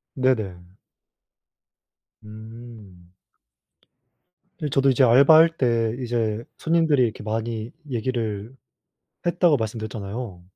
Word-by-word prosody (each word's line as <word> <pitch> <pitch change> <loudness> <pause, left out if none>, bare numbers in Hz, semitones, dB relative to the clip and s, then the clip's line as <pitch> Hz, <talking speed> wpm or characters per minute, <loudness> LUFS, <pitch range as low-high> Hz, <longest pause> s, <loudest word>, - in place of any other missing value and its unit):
네네. 110 - -1 1.5
음. 110 -4 -13 1.5
이제 150 - -4
저도 135 0 +2
이제 130 0 +3
알바할 155 +7 +6
때 115 -3 +1
이제 115 -2 -2
손님들이 160 -5 +2
이렇게 110 -3 -3
많이 110 +1 -4 0.2
얘기를 115 -3 -3 0.7
했다고 175 -2 +3
말씀드렸잖아요. 110 -3 -6
115 Hz, 210 characters per minute, -23 LUFS, 110-130 Hz, 1.5 s, 알바할